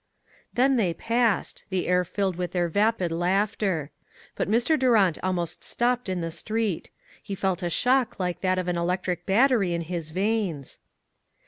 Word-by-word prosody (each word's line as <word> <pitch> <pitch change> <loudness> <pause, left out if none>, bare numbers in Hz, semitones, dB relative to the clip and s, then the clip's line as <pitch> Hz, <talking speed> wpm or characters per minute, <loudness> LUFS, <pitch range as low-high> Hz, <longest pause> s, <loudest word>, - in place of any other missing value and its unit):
Then 265 +2 +3
they 180 -7 +1
passed, 230 +1 0
the 185 -2 -1
air 180 0 +3
filled 190 +1 -1
with 180 -1 -4
their 175 -1 +1
vapid" 200 0 +1
laughter. 185 -2 0 0.4
But - - -2
Mr. 240 +8 +3
Durant 215 -10 +3
almost 180 -3 -2
stopped 245 -2 0
in 185 -2 -1
the 165 0 -3
street. 215 +1 -2 0.3
He 200 - -5
felt 190 -1 -1
a 175 - -1
shock 250 +3 +1
like 180 -2 -2
that 185 -1 +1
from 180 -1 -1
an 175 - 0
electric 180 0 -2
battery 205 -4 +3
in 170 - -2
his 165 -1 -4
veins. 190 - -2
185 Hz, 160 wpm, -26 LUFS, 175-225 Hz, 0.4 s, Then